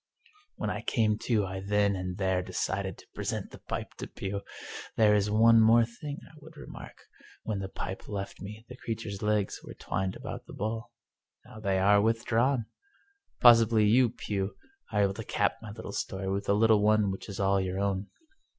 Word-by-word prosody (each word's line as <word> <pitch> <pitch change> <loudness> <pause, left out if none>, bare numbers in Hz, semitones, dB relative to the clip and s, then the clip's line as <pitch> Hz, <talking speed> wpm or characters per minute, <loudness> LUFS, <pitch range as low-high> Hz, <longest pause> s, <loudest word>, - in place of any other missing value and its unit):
When - - -2
I - - -3
came 110 -2 +1
to 110 -5 +2
I 95 0 -5
then 100 +1 +2
and 90 -1 -4
there 95 -2 +1
decided - - -2
to - - -16
pre - - -5
sent - - -3
the - - -11
pipe - - -5
to - - -5
Pugh. 100 +1 -4 0.6
There 105 -2 +6
is 105 0 +2
one 115 +2 +6
more 115 +1 +6
thing 140 +5 -7
I - - -16
would 155 +1 -14
remark. - - -10 0.4
When 105 -3 -2
the 95 -1 -4
pipe 95 0 -6
left 100 -2 -5
me 105 +3 -8
the 125 - -9
creature's 110 -4 -5
legs 105 -2 0
were - - -10
twined 95 -1 -2
about - - -7
the - - -10
bowl. 110 +2 -3 0.6
Now 110 - -12
they 100 -3 0
are 100 +2 +5
withdrawn. 115 +3 +2 0.8
Pos 120 -2 +9
sibly 110 -1 +3
you, 120 +3 +5
Pugh, 100 -4 -3 0.4
are 105 -2 +3
able 100 -1 +2
to 115 - -6
cap 100 0 0
my 110 -2 -8 0.2
story 95 -1 -3
with 100 +1 -2
a - - +5
little 110 0 +4
one 105 -1 +3
which 95 - -7
is 100 - -6
all 100 0 +3
your 95 0 -2
own." 100 0 -1
105 Hz, 195 wpm, -29 LUFS, 100-115 Hz, 0.8 s, Pos